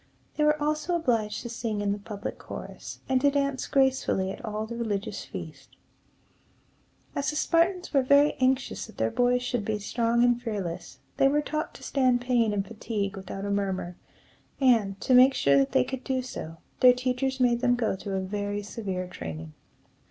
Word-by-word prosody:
They 300 - +1
were 300 0 +3
also 305 +4 0
obliged 230 -10 0
to 235 - -6
sing 230 -2 -3
in 205 -1 0
the 205 - -2
public 200 0 -6
chorus, - - -8
and 260 -1 +2
to 285 - +5
dance 280 -1 -1
gracefully 265 -8 +2
at - - -9
all 215 -1 -3
the 235 +2 -7
religious 210 -4 -3
feasts. - - -9 1.5
As 280 - 0
the 300 - -3
Spartans 350 +3 +1
were 275 - +5
very 280 +3 +5
anxious 260 -1 0
that 220 - -16
their 110 0 0
boys 245 0 +2
should 245 -3 -1
be 215 +1 -1
strong 235 +3 +1
and 245 -1 +3
fearless, 195 -7 -5 0.2
they 270 - +5
were 295 +2 +2
taught 305 +1 -3
to - - -12
stand 255 -3 +2
pain 240 -3 +2
and 200 -1 -1
fatigue 210 -2 -3
without 195 +1 -6
a 200 - -2
murmur; 190 -3 -2 0.6
and, 225 -7 +3
to 260 - +1
make 255 +2 +7
sure 140 - +3
that 135 - +1
they 130 - +4
could 260 - -6
do 260 -1 -1
so, 165 -9 -7 0.2
their 250 -1 +8
teachers 255 +1 -1
made 240 -1 +3
them 245 -1 +3
go 235 -5 0
through 195 +1 -5
a - - -1
very 205 +1 -3
severe 195 -3 -4
training. 80 - -7
235 Hz, 190 wpm, -27 LUFS, 200-265 Hz, 1.5 s, their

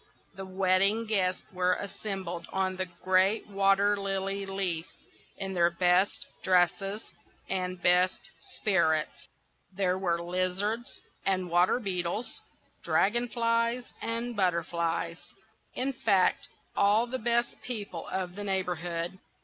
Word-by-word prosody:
The 195 -1 -8
wedding 190 +4 +2
guests 190 -4 0
were 180 0 +2
assembled 195 -4 -5
on 190 -1 0
the 185 0 -2 0.2
great 190 +3 +3
water 200 0 +3
lily 195 0 -2
leaf, 185 -4 -2 0.5
in 195 0 -3
their 170 -1 +4
best 180 +3 +2 0.2
dresses 190 +3 +2 0.4
and 185 -1 -2
best 180 +1 +2 0.2
spirits. 160 -6 +1 0.4
There 185 -1 0
were 170 -3 0
lizards 185 +7 -2 0.2
and 185 -2 0
water 175 +7 +4
beetles, 190 +1 -3 0.4
dragon 240 +5 +2
flies 230 +1 0
and 230 +1 -2
butterflies,—in 170 +7 -2
fact, 200 -7 +2 0.3
all 205 +3 +4
the 260 +2 -4
best 235 +1 0
people 205 -8 -5
of 185 -2 -3
the 205 +2 -6
neighbourhood. 175 -2 -2
190 Hz, 110 wpm, -29 LUFS, 180-205 Hz, 0.5 s, their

